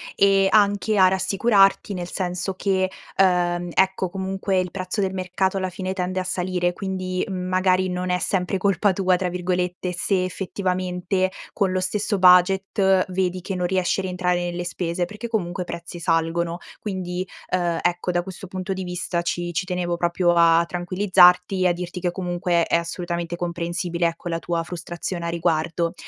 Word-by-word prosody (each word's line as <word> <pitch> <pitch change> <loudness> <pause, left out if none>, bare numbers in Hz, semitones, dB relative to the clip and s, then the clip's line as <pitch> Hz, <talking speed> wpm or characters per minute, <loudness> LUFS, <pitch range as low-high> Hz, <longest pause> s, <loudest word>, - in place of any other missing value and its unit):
e 195 -1 +4
anche 205 0 +3
a 185 -1 +7
rassicurarti 195 +2 +3
nel 175 -1 -5
senso 180 0 -3
che, 190 -1 0 0.3
uhm, 175 -2 +2
ecco 190 0 +2
comunque 190 0 -2
il 180 - -5
prezzo 185 +2 -3
del 190 -1 -1
mercato 190 +1 -1
alla 185 -1 -1
fine 185 +1 -4
tende 185 0 -2
a - - -3
salire 180 -1 -1
quindi, 185 0 -3
mhmm, 185 -1 -4
magari 185 0 +2
non 180 0 -3
è 180 - +2
sempre 185 +1 0
"colpa 195 0 +2
tua", 185 -1 +2
tra 185 -1 -1
virgolette, 180 0 -2
se 180 +1 0
effettivamente, 185 0 -1 0.2
con 195 -3 0
lo 185 - 0
stesso 205 +2 -1
budget, 190 +1 +4
vedi 185 -1 -1
che 190 +1 -4
non 180 0 -1
riesci 185 +1 0
a - - -2
rientrare 180 -1 0
nelle 175 0 -4
spese, 175 0 -2
perché 210 +6 -5
comunque 185 -4 -2
i - - -15
prezzi 170 0 -7
salgono. 170 +1 0 0.2
Quindi, 185 -2 -4 0.2
uhm, 175 -2 0
ecco 175 +1 0
da 175 0 0
questo 190 0 -9
punto 185 +1 -5
di 190 -1 -3
vista 180 -1 -2
ci 175 0 -2
ci 180 +3 -2
tenevo 180 -2 -2
proprio 170 0 0 0.2
a 170 0 +5
tranquillizzarti 180 +1 +4
e - - +5
a 175 - +3
dirti 180 +1 -5
che 175 -1 -1
comunque 175 -2 0
è - - +2
assolutamente 170 0 -2
comprensibile, 170 0 -2
ecco, 170 +1 -2
la 165 - -1
tua 170 0 -2
frustrazione 175 +1 -5
a - - -1
riguardo. 170 0 0
180 Hz, 175 wpm, -23 LUFS, 175-190 Hz, 0.3 s, a